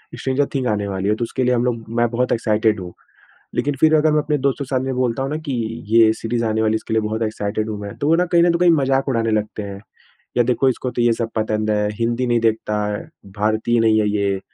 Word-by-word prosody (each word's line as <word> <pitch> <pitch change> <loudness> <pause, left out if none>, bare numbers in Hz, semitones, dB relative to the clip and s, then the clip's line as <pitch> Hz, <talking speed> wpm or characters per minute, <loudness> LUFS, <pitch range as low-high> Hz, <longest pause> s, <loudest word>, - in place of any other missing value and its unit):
Stranger 135 +2 0
things 130 -2 0
आने 105 -1 -1
वाली 95 +1 -2
है। 105 - +2
तो 120 - -3
उसके 125 +2 -2
लिए 125 0 +2
हम 120 - +1
लोग 115 -2 -2
मैं 120 - +3
बहुत 125 +1 -1
एक्साइटेड 110 -2 +1
हूँ। 90 -1 -8 0.6
लेकिन 145 0 0
फ़िर 160 0 +5
अगर 155 0 +4
मैं 155 - +3
अपने 150 0 0
दोस्त 140 0 0
के 140 - -3
सामने 130 0 -2
बोलता 125 -1 -1
हूँ 135 - -3
ना 150 - -2
कि 140 - -2 0.4
ये 110 0 +5
सीरीज़ 115 +1 -2
आने 110 0 0
वाली 110 - +2
है। - - +3
इसके 110 - -4
लिए 110 - +3
बहुत 110 +1 -2
एक्साइटेड 110 0 -2
हूँ 105 -1 -4
मैं। 100 -1 -7
तो 145 - -2
वो 160 - +5
ना 180 - +2
कहीं 170 -1 +3
न 175 0 +4
तो 170 - 0
कहीं 175 0 +5
मज़ाक 135 -3 +2
उड़ाने 115 -3 0
लगते 105 0 -2
हैं। 100 -1 -7 0.6
या 120 - +5
देखो 125 +2 +2
इसको 125 0 -2
तो 120 0 -1
ये 120 -1 +4
सब 115 0 -3
पसंद 110 0 0
है, 105 0 +1
हिंदी 120 +3 -1
नहीं 120 -1 +2
देखता, 110 -1 0 0.6
भारतीय 110 +3 +1
नहीं 110 -1 +4
है 105 - +1
ये। 100 -2 0
115 Hz, 260 wpm, -20 LUFS, 110-130 Hz, 0.6 s, फ़िर